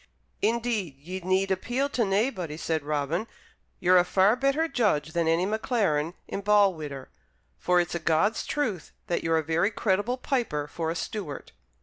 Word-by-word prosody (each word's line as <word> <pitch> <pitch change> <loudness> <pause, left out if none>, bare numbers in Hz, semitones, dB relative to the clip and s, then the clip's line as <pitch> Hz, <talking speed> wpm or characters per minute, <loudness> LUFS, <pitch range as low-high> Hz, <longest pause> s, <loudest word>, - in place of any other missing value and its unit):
"Indeed, 225 - 0
ye 180 +7 -6
need 190 +1 +1
appeal 245 +9 0
to 255 - -1
naebody," 195 - -1
said 160 -1 -1
Robin. 150 +7 -2 0.5
"Ye're 180 0 +5
a - - +4
far 190 +4 +3
better 275 +5 +1
judge 160 - 0
than 170 -1 +1
any 165 +3 +2
Maclaren 195 - 0
in 200 - -4
Balwhidder: 185 -10 +1 0.5
for 180 0 +3
it's 175 -1 -1
a 170 - -1
God's 165 +7 +1
truth 235 - -2
that 175 - -1
you're 165 0 +2
a 160 - 0
very 165 +6 +1
creditable 210 +3 0
piper 235 - -1
for 160 +1 -3
a 165 - -2
Stewart. 165 -2 -5
185 Hz, 160 wpm, -27 LUFS, 160-220 Hz, 0.5 s, Ye're